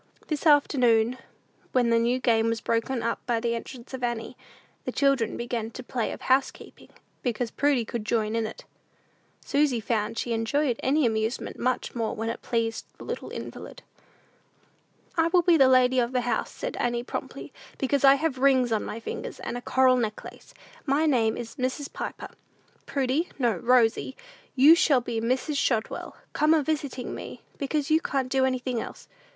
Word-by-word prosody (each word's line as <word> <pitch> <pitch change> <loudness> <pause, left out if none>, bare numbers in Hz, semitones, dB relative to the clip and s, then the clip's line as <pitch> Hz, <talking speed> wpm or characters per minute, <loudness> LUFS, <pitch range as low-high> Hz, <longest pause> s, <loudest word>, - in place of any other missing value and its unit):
This 305 +1 -1
afternoon, 250 -5 +4 0.5
when 245 -2 +3
the 230 - +4
new 240 +2 +2
game 230 -3 +2
was 230 0 -1
broken 230 +2 -1
up 230 0 -1
by 235 -2 +1
the 235 0 -1
entrance 235 +2 -8
of 260 -1 -5
Annie, 235 -2 -3 0.5
the - - -3
children 275 -6 +1
began 235 -2 -3
the 255 - -8
play 240 -1 -2
of - - -8
housekeeping, 265 +1 -1 0.3
because 240 -1 -2
Prudy 280 -5 +1
could 230 0 -4
join 215 0 0
in 225 -1 0
it. 220 - -10 0.8
Susy 280 -4 +2
found 220 0 -2
she 235 - -1
enjoyed 240 +3 0
any 285 +2 +2
amusement 220 +1 -2
much 255 0 -1
more 230 -2 -2
when 225 +1 -3
it 230 - -5
pleased 225 -1 -2
the - - -10
little - - -5
invalid. - - -8 1.3
"I 325 0 +4
will 350 +1 +3
be 345 0 +5
the 270 -4 +6
lady 255 0 +4
of 240 +1 0
the 250 - +2
house," 245 0 -1
said - - -6
Annie, 240 0 -1
promptly, - - -6 0.2
"because 275 +1 0
I 275 0 +8
have 280 -2 -2
rings 260 -3 +3
on 220 - +1
my 225 - -5
fingers, 225 - -6
and - - -4
a 245 - -4
coral 260 0 +3
necklace. 220 -3 -5 0.3
My 290 +2 +1
name 235 -7 +2
is 235 +2 -7
Mrs. 260 +2 -3
Piper. - - -6 0.6
Prudy, 275 +5 0
no, 240 -6 +1
Rosy, 245 +4 +2 0.4
you 280 +4 +8
shall 285 -6 +4
be 235 -2 -3
Mrs. 260 +5 -1
Shotwell, 225 -5 -1 0.2
come 310 +1 +4
a 310 - +2
visiting 285 -4 -3
me; - - -8 0.2
because 290 +1 -1
you 315 +1 +4
can't 270 -6 -1
do 265 -1 +3
anything 255 -2 -1
else. - - -9
250 Hz, 175 wpm, -26 LUFS, 230-275 Hz, 1.3 s, I